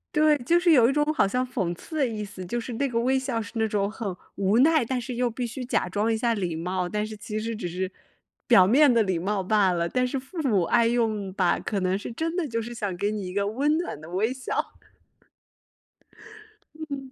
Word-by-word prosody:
对， 305 -1 +5
就 335 +8 +2
是 350 -1 +3
有 240 -3 +6
一 - - +2
种 295 +1 +2
好 - - +3
像 250 +6 0
讽 195 -9 -2
刺 315 - -10
的 285 - +3
意 215 -2 -4
思。 195 -2 -9
就 240 +7 -2
是 235 +1 -6
那 275 +4 0
个 230 -2 -1
微 260 +3 +2
笑 260 -3 -2
是 210 - -8
那 225 -1 +1
种 200 -1 0
很 210 -3 -4 0.2
无 200 +3 +2
奈， 310 0 +5
但 250 +2 -2
是 245 0 -5
又 245 0 +1
必 240 +1 -4
须 250 +3 -6
假 240 - 0
装 205 +5 0
一 225 - +1
下 235 +1 +1
礼 180 -6 -2
貌， 180 +2 -2
但 210 +2 -1
是 215 0 -7
其 210 +1 -5
实 225 +1 -3
只 210 -5 -4
是 185 +2 -3 0.6
表 190 -7 +6
面 275 +3 +5
的 230 - +4
礼 190 -3 -1
貌 195 +3 -1
罢 195 -1 +3
了， 170 -1 0
但 255 +6 0
是 265 +2 -2
父 265 +7 -13
母 205 -9 +2
爱 230 +6 +3
用 220 -5 0
吧， 180 -3 +2
可 200 - -2
能 185 +1 0
是 205 - -7
真 325 +8 -3
的 360 -4 0
就 230 -3 -2
是 235 +2 -7
想 205 -5 -3
给 200 +3 0
你 210 -2 -4
一 180 - -6
个 200 0 0
温 285 +8 +1
暖 335 - -4
的 160 - -10
微 210 +7 0
笑。 260 0 -5 2.4
嗯。 270 -2 -6
225 Hz, 260 characters per minute, -26 LUFS, 195-255 Hz, 2.4 s, 有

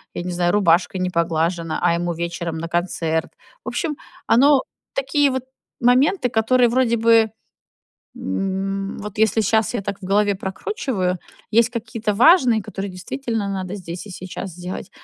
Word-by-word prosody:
я - - -3
не 180 - -4
знаю, 175 0 +1
рубашка 185 -2 +3
не 185 0 -1
поглажена, 165 0 0
а - - +3
ему 175 0 -1
вечером 170 0 -4
на 165 +1 -4
концерт. 165 -2 -1 0.3
В - - -14
общем, 305 -4 -2 0.3
оно 275 +2 +5 0.3
такие 280 +1 +2
вот 260 -1 -2 0.4
моменты, 250 +4 +3
которые 240 +2 +3
вроде 235 -1 +2
бы, 225 0 +5 0.9
м, 195 - -3
вот 210 0 -8
если 220 0 +3
щас 220 +3 +1
я 220 - -1
так 200 0 -4
в - - -10
голове 205 +1 +2
прокручиваю, 190 - -2 0.3
есть 230 +2 +4
какие-то 225 -3 -3
важные, 245 - +5
которые 195 -1 -5
действительно 220 +4 -4
надо 190 0 -4
здесь 175 0 -7
и - - -9
сейчас 185 +1 -7
сделать, 180 +2 -7
200 Hz, 155 wpm, -21 LUFS, 180-235 Hz, 0.9 s, оно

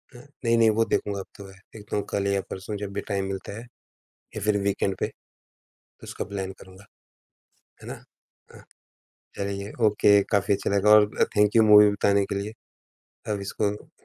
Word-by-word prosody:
हाँ। 120 - -12 0.2
नहीं, 115 0 +3
नहीं। 115 -1 +5
वो 110 +1 +2
देखूँगा 100 -2 -2
अब 95 - -7
तो 100 - -10
वह, 95 - -13 0.2
देखता 105 -2 -7
हूँ 100 - -2
कल 100 -1 -1
या 100 0 0
परसों 105 +3 -6
जब 100 -1 -6
भी 100 - -3
टाइम 100 -2 -2
मिलता 95 +1 -6
है - - -7 0.7
या 105 - -5
फिर 105 -1 +2
वीकेंड 100 -1 -1
पे, - - 0 1.0
इसका - - -6
प्लान 95 -1 -5
करूँगा, 95 +1 -15 1.0
है - - -11
ना? - - -5 0.6
हाँ। - - -15 0.7
चलिए 100 +1 -4 0.2
ओके, 100 -1 +4
काफ़ी 100 0 +2
अच्छा 100 - -2
लगा 100 +1 +2
और 105 - +7 0.2
अ, - - +8
थैंक 105 +1 +3
यू 115 - +6
मूवी 105 -1 +7
बताने 100 0 +1
के 100 - -4
लिए, 100 +2 -4 0.8
अब 100 - -3
इसको 105 +1 -4
100 Hz, 185 wpm, -25 LUFS, 100-105 Hz, 1.0 s, अ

